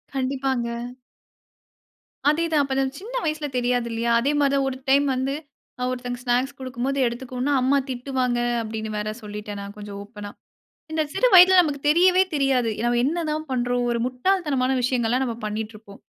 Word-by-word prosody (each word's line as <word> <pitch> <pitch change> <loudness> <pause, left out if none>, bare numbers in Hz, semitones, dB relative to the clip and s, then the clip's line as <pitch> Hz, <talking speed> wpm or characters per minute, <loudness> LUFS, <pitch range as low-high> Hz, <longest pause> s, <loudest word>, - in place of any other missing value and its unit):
கண்டிப்பாங்க. 260 -3 -1 1.5
அதே 330 +3 +2
தான். 300 - +4
அப்ப 275 -1 -3
நான் 270 +1 -1
சின்ன 465 +4 -9
வயசுல 305 -1 -1
தெரியாது 245 -1 0
இல்லையா? 230 +1 -1
அதே 275 +5 +1
மாரி 280 -1 +3
தான் 275 -1 +2
ஒரு 260 - -6
டைம் 280 +1 +5
வந்து, 265 +2 -1 0.5
ஆ - - 0
ஒருத்தங்க 245 -1 -4
ஸ்நாக்ஸ் 255 +3 0
குடுக்கும்போது 260 +1 -3
எடுத்துக்கோன்னா, 250 +3 -3
அம்மா 265 +2 +3
திட்டுவாங்க 255 -1 -1 0.2
அப்டினு 220 -1 -5
வேற 210 0 -2
சொல்லிட்டேன் 210 -1 -6
நான், 200 +1 -8
கொஞ்சம் 205 -1 -8
ஓப்பன்னா. 205 -1 -9 0.6
இந்த 315 0 0
சிறு - - +3
வயதில 370 +1 +9
நமக்கு 290 -5 -2
தெரியவே 365 +4 +5
தெரியாது. 270 -4 +2 0.2
நம்ம 240 0 +2
என்னதான் 310 0 -2
பண்றோம். 245 -1 0
ஒரு 235 - 0
முட்டாள் 345 +10 0
தனமான 260 -2 +1
விஷயங்கள்லாம் 245 0 +1
நாம 235 -2 -4
பண்ணிட்ருப்போம். 215 -1 -7
255 Hz, 160 wpm, -24 LUFS, 235-280 Hz, 1.5 s, வயதில